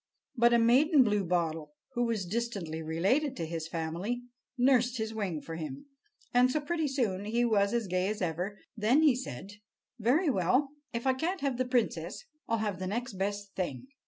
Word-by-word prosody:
But 235 -1 +5
a 235 - +6
maiden 260 +6 +5
bluebottle, 170 -8 0 0.2
who 240 -1 +1
was 225 -5 -1
distantly 195 -6 -3
related 200 - +1
to 165 - -2
his 165 0 -4
family, 170 +9 -3 0.3
nursed 250 -1 +3
his 220 0 -3
wing 190 -8 -2
for 165 0 -7
him, 150 - -6 0.5
and 250 +1 +5
so 305 - +1
pretty 320 +1 -1
soon 220 -8 -1
he 235 +3 +1
was 200 -3 +3
as 235 -2 0
gay 185 0 0
as 210 +1 -2
ever. 180 +3 -2 0.2
Then 235 +8 +3
he 290 -5 +6
said: 200 - -6 0.5
"Very 265 - +3
well, 250 - +2 0.2
if 235 +1 -4
I 265 - +4
can't 335 +8 -2
have 275 -3 0
the 255 - +2
princess, 250 - -1 0.2
I'll 230 - +1
have 210 -4 -2
the 185 - -3
next 240 +4 -3
best 200 +1 -3
thing." 185 - -4
220 Hz, 185 wpm, -30 LUFS, 185-250 Hz, 0.5 s, a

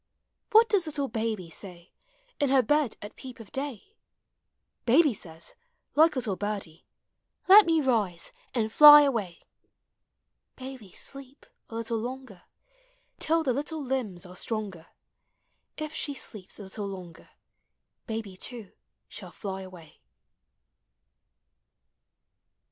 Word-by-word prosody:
What 450 +2 +7
does 400 -7 +2
little 285 -4 -2
babv 220 -7 -3
say, 180 -3 -10 0.5
In 285 - +2
her 265 -1 +4
bed 295 +1 +1
at 205 - -9
peep 255 -1 -10
of 225 - -12
day? 280 - -5 0.9
Baby 285 +3 +5
says, 165 -4 -7 0.4
like 315 +2 +5
little 235 -7 -1
birdie, 200 -5 -5 0.6
Let 400 0 +9
me 325 -1 +3
rise 210 - 0 0.2
and 220 -2 0
fly 295 0 +11
awav. 215 -11 -1 1.2
Baby 255 -7 -9
sleep, 275 +5 -7 0.2
a 225 - -8
little 230 0 -2
longer, 245 -5 -7 0.8
Till 325 +1 +2
the 260 -5 +1
little 295 +3 -3
limbs 230 -9 -3
are 180 0 -12
stronger, 200 -5 -4 0.9
If 310 0 -5
she 285 - -3
sleeps 210 -7 -7
a 210 - -9
little 200 +1 -6
longer, 180 -4 -10 0.8
Baby 220 -4 -5
too 230 -2 -6 0.4
shall - - -10
fly 195 -2 -6
away. 180 -4 -13
230 Hz, 120 wpm, -28 LUFS, 195-280 Hz, 1.2 s, fly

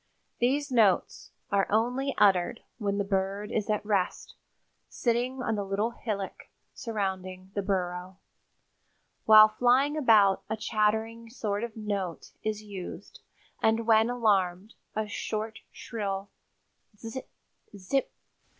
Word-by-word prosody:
These 275 +4 +1
notes 215 -7 +2 0.2
are 200 -1 +2
only 250 +6 +1
uttered 200 +2 +3 0.2
when 200 -2 -1
the 200 - +1
bird 195 +1 -2
is 215 -1 -1
at 210 -1 0
rest, 200 -4 -1 0.6
sitting 250 +2 -1
on 225 - 0
the 205 -2 -1
little 200 +4 -1
hillock 205 -5 -5 0.2
surrounding 190 -4 -4
the 200 - -1
burrow. 185 -1 -2 1.1
While 215 0 +9
flying 250 +6 +3
about 215 -9 +5
a 220 - -1
chattering 220 +2 0
sort 210 -3 -3
of 235 -2 -6
note 200 -5 -4
is 215 0 -3
used 200 -2 -8 0.4
and 225 +1 +2
when 225 0 +5
alarmed 205 -4 +1 0.2
a 215 0 -1
short 220 +1 -4
shrill 195 -3 -4 0.7
'tzip 225 +4 -7 0.5
tzip. 200 +8 -1
215 Hz, 120 wpm, -28 LUFS, 195-230 Hz, 1.1 s, While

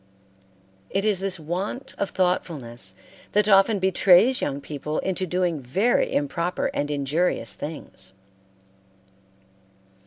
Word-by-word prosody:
It 195 +2 -1
is 210 -4 +2
this 195 -2 -2
want 185 - -4
of 200 - 0
thoughtfulness 130 - -1 0.4
that 210 0 +3
often 200 +1 +5
betrays 190 +5 +4
young 140 -1 -2
people 150 +1 -5
into 185 0 -1
doing 175 -3 0
very 195 - +1
improper 170 +5 -1
and 145 - -1
injurious 145 - 0
things. 95 -7 -8
175 Hz, 105 wpm, -24 LUFS, 145-195 Hz, 0.4 s, often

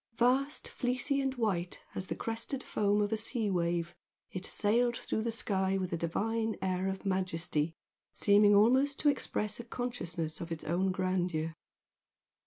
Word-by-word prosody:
Vast, 260 +5 +2
fleecy 255 +3 0
and 270 -1 -1
white 190 -7 -1
as 185 - -2
the - - -2
crested 230 +4 -3
foam 205 0 +2
of 205 - -2
a - - +1
sea 220 -1 -1
wave, 170 -1 0 0.4
it 185 0 -4
sailed 235 +3 +2
through 220 - -2
the 230 +1 -1
sky 195 -4 +1
with 185 -2 -2
a - - +2
divine 220 +7 -1
air 185 0 0
of 190 +1 -4
majesty, 170 -4 -1 0.4
seeming 205 0 +5
almost 260 +7 +4
to 295 - +5
express 215 -6 -1
a - - -5
consciousness 205 -10 -4
of 170 0 -6
its 165 - -4
own 185 +4 +1
grandeur. 180 -3 -1
205 Hz, 160 wpm, -32 LUFS, 180-235 Hz, 0.4 s, seeming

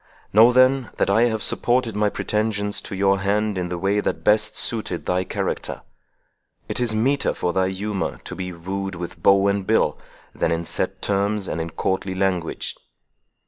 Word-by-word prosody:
Know 115 +4 +8
then, 130 0 +4
that - - +2
I 110 +4 +5
have 110 -2 0
supported 120 -3 +1
my 105 0 +2
pretensions 105 -1 -1
to - - -7
your 95 0 +2
hand 105 +2 0
in 90 -1 -2
the 90 - -3
way 100 +3 +1
that - - -2
best 105 0 +3
suited 110 -7 -3
thy 90 +1 +1
character. - - -4 0.8
It - - -3
is 120 -3 0
meeter 135 +6 +1
for 90 - -1
thy 95 +1 +2
humour 100 +1 -3
to - - -7
be 90 -1 -5
wooed 95 +3 -4
with 85 0 -7
bow 100 0 +5
and 100 -1 0
bill, - - +2 0.3
than - - 0
in 85 0 -1
set - - -3
terms, 100 0 0
and 80 - -2
in 80 - -4
courtly 95 +2 -2
language." 95 -3 -1
100 Hz, 180 wpm, -23 LUFS, 95-110 Hz, 0.8 s, Know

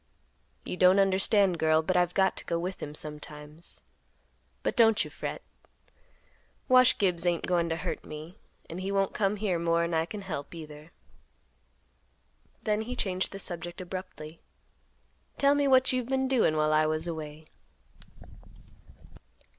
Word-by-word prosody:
You - - -5
don't 185 +1 +6
understand, 195 -1 +3
girl, 160 0 +3
but 185 +3 -1
I've 180 0 +2
got 190 -1 +3
to - - -5
go 170 - -1
with 180 +3 -4
him 150 0 -6
sometimes. 150 +1 -8 0.8
But - - -1
don't 225 -4 +5
you - - -9
fret; - - -6 1.2
Wash 255 0 +6
Gibbs 180 -4 +1
ain't 175 -2 0
goin' 170 -2 +1
to 165 - 0
hurt 175 +1 -4
me, 155 +3 -9 0.3
and 170 +3 -6
he 195 +1 -3
won't 195 -1 +1
come 200 0 +1
here 195 -4 -1
more'n 170 0 +1
I 160 0 +1
can 210 +3 -7
help, 170 -5 -6
either." 155 0 -10 1.7
Then 210 -1 0
he 245 +3 -5
changed 190 -5 -1
the 195 - -7
subject 175 -2 -6
abruptly. 175 -3 -8 1.0
"Tell 280 0 +4
me 285 -1 +2
what 260 -1 +4
you've 250 -2 -1
been 265 0 +1
doin' 240 -12 +2
while 155 0 +2
I 155 0 +4
was 155 +2 -1
away." 155 -2 -6
175 Hz, 150 wpm, -29 LUFS, 160-200 Hz, 1.7 s, don't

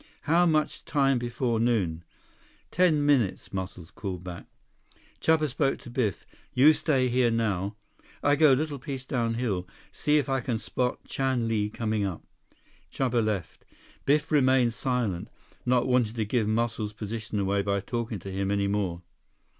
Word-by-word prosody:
"How 170 +3 +4
much 155 -2 0
time 135 -3 +2
before 120 -1 -1
noon?" 100 -9 +1 0.7
"Ten 160 -5 +3
minutes," 130 -12 +1
Muscles 95 -2 -5
called 95 -4 -5
back. 90 -2 -8 0.7
Chuba 160 -1 +3
spoke 135 +1 0
to 120 - -12
Biff. 120 -6 -1 0.3
"You 145 +5 +7
stay 135 -5 +1
here 125 0 +3
now. 105 -3 -1 0.5
I 145 0 +4
go 150 -2 +6
little 145 +1 -1
piece 135 0 -6
down 115 -3 -1
hill, 100 -7 -2 0.2
see 150 0 +2
if 145 - +1
I 135 -1 +1
can 120 -2 -1
spot 125 +2 -2
Chan 130 -3 -1
Li 105 -2 0
coming 110 -1 -1
up." 95 -4 -3 0.7
Chuba 120 -3 +1
left. 105 -5 -3 0.4
Biff 150 +2 +2
remained 130 -5 +4
silent, 120 -8 -1 0.4
not 125 -1 +3
wanting 125 -3 +2
to 110 -2 -1
give 110 0 0
Muscles' 110 -1 -1
position 105 0 -5
away 100 +1 +1
by 100 0 0
talking 115 +2 -3
to 95 +1 -8
him 95 +1 -2
any 100 0 +1
more. 95 -4 -1
120 Hz, 155 wpm, -27 LUFS, 100-135 Hz, 0.7 s, You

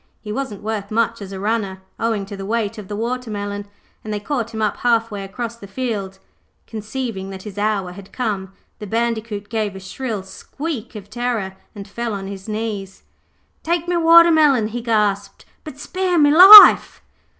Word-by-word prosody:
He 210 - -8
wasn't 215 -4 -5
worth 210 -2 -4
much 225 -1 -1
as 195 -1 -8
a 190 - -7
runner, 200 -2 -2 0.2
owing 225 -3 -1
to 200 +1 -9
the 195 - -8
weight 220 +1 -3
of 205 - -10
the 205 - -6
watermelon, 210 -3 -4 0.4
and 215 - -7
they 210 - -3
caught 235 0 -3
him 220 - -6
up 215 -2 -1
half 230 -2 +1
way 200 -1 -6
across 230 +4 -6
the 200 - -12
field. 200 -4 -4 0.5
Conceiving 215 -2 -6
that 190 -1 -9
his 205 -1 -8
hour 205 -3 -1
had 195 +1 -13
come, 205 -6 -4 0.3
the 210 - -8
Bandicoot 225 -2 -3
gave 215 -3 -3
a - - -8
shrill 210 +2 -5
squeak 255 - -7
of 205 -1 -10
terror 225 -5 -3 0.2
and 200 0 -9
fell 230 +2 -4
on 195 -1 -6
his 195 +1 -9
knees. 210 -3 -5 0.6
'Take 340 +1 -2
me 355 - 0
watermelon,' 325 -8 +5
he 240 +2 -5
gasped,'but 210 +5 -3
spare 370 +4 -2
me 290 -2 +4
life.' 400 +4 +9
215 Hz, 175 wpm, -19 LUFS, 200-240 Hz, 0.6 s, life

